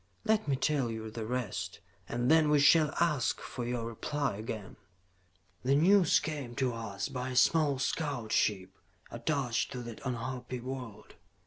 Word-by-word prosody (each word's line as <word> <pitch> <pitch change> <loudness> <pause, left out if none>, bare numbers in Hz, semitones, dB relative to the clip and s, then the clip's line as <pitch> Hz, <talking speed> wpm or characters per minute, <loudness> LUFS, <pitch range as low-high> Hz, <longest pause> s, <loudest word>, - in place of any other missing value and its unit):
Let 215 -3 +2
me 140 - +2
tell 135 -2 +1
you 110 -1 -5
the 110 -1 -5
rest, 125 -4 -3 0.3
and 120 +3 +1
then 160 -1 +5
we 150 - +5
shall 150 +1 +6
ask 150 -7 +1
for 125 - -6
your 120 -1 -2
reply 140 +2 -2
again. 110 -2 -6 0.8
"The 135 +2 +2
news 180 +2 +5
came 145 -6 -5
to 130 -3 0
us 100 -4 -4
by 130 -2 -4
a 130 - -5
small 145 +2 +4
scout 130 -5 -2
ship 95 -3 +1 0.4
attached 125 -1 -1
to 125 -1 -5
that 115 -2 -9
unhappy 125 0 -4
world. 125 -4 -8
125 Hz, 155 wpm, -31 LUFS, 115-145 Hz, 0.8 s, shall